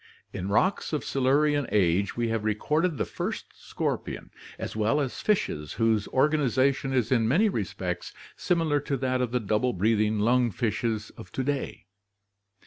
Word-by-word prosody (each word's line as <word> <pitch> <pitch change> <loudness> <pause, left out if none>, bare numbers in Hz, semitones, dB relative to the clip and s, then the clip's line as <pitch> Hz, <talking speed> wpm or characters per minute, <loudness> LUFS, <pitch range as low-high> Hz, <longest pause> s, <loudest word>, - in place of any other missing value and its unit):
In 90 - -4
rocks 170 - +1
of 150 - -1
Silurian 145 +2 +2
age 95 0 +2
we 120 -1 0
have 115 -1 -1
recorded 150 - 0
the - - 0
first - - -5
scorpion - - -4 0.3
as - - -5
well 110 +7 +2
as 135 -4 -3
fishes 75 - 0
whose 110 -3 +1
organization 135 -1 +2
is 125 -3 0
in 115 -3 +3
many 190 - +3
respects - - -3 0.2
similar 165 -5 +1
to 140 -1 -2
that 130 0 0
of 125 - 0
the 125 - +1
double 110 +3 0
breathing 110 +2 +2
lung 120 +3 +3
fishes 110 0 -2
of 90 - -12
to 130 - -1
day. 140 0 -3
125 Hz, 155 wpm, -27 LUFS, 110-145 Hz, 0.3 s, in